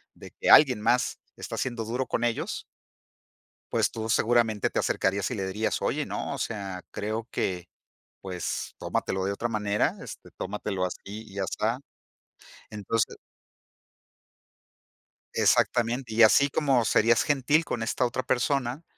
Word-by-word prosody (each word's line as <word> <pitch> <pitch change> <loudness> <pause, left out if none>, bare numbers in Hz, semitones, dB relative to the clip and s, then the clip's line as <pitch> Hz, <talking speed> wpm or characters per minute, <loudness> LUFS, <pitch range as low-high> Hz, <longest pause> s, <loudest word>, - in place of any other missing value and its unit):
de - - -12
que - - -2
alguien 130 -7 +8
más 125 +3 +1 0.2
está - - -6
siendo 120 -3 -2
duro 125 +4 -2
con - - -1
ellos 120 -1 -2 1.1
pues, - - +2
tú 110 0 -5
seguramente 115 -2 +2
te - - -2
acercarías 95 0 0
y - - -2
le 100 -4 -3
dirías: 105 +4 -1
"Oye, - - 0
no, - - -4
o - - -6
sea, 100 -4 -4
creo 110 +2 -3
que, 90 -5 -2 0.5
pues, 90 -3 -4
tómatelo 95 0 -2
de 100 - 0
otra 115 +4 -2
manera, 105 -2 0
este, - - -10
tómatelo 100 -3 -3
así, 90 - -4
y 105 +1 -9
ya 100 -1 -1
está". 110 +5 -1 0.9
Entonces 105 +2 -1 2.2
Exactamente. 120 0 +2
Y 115 - +5
así 140 +6 +6
como 135 -4 +2
serías 115 +1 +4
gentil 145 +3 +2
con 120 - -3
esta 120 +2 0
otra 120 +2 -2
persona, 130 +3 0
115 Hz, 140 wpm, -27 LUFS, 100-125 Hz, 2.2 s, alguien